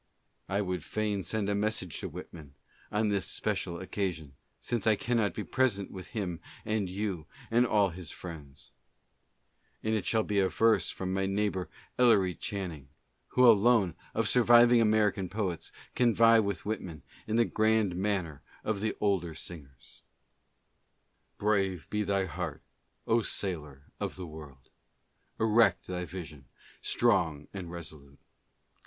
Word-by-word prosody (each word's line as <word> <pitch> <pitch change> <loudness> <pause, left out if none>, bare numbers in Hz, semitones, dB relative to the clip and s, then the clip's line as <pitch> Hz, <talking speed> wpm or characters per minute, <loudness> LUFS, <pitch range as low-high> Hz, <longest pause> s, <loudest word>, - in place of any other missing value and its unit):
I 100 +1 +1
would 90 -4 -3
fain 105 +2 -1
send 100 +3 -2
a 100 - +1
message 100 -5 -1
to - - -5
Whitman, 75 -5 -10 0.4
on 105 +1 +1
this 100 -2 0
special 85 - -2
occa 95 +1 -2
sion, 80 -5 -11 0.3
since 115 -3 -2
I 110 - +6
cannot 110 -3 0
be 105 - -3
present 110 -7 0
with 95 -2 -8
him 95 -8 -4 0.3
and 105 -3 0
you 95 -4 -3 0.2
and 120 +2 +4
all 100 -4 +3
his 85 -1 -8
friends. 75 -7 -9 1.1
And 110 - 0
it 110 - -1
shall 110 -1 +2
be 105 -1 0
averse 100 +4 +3
from 95 0 -4
my 95 0 0
neighbor 95 -3 -1 0.3
Ellery 100 -7 +5
Chan 95 0 -4
ning, 70 -4 -12 0.4
who 125 0 +4
alone 110 -4 +5 0.2
of 115 -1 +1
surviving 120 0 +6
American 105 -4 +2
poets 95 -4 -3 0.2
can 120 -3 +3
vie 115 0 +6
with 100 -3 -2
Whit 110 +1 -2
man 80 -5 -9 0.2
in 110 - -1
the 115 0 +4
grand 110 -4 +2
manner 90 -6 -1 0.2
of 105 -2 -1
the 110 0 -1
older 90 -6 0
singers: 70 -8 -10 0.7
" - - -46
Brave 95 -4 0
be 105 - 0
thy 100 -1 +1
heart, 85 - -5 0.4
O 115 +1 +3
sailor 75 -10 -3 0.2
of - - -3
the 90 - -6
world! 75 -5 -12 0.7
Erect 110 -3 +4
thy 90 -1 -4
vision, 80 -5 -8 0.4
strong 85 -11 +1
and 95 -3 -6
resolute. 80 -5 -9
100 Hz, 150 wpm, -30 LUFS, 85-110 Hz, 1.1 s, I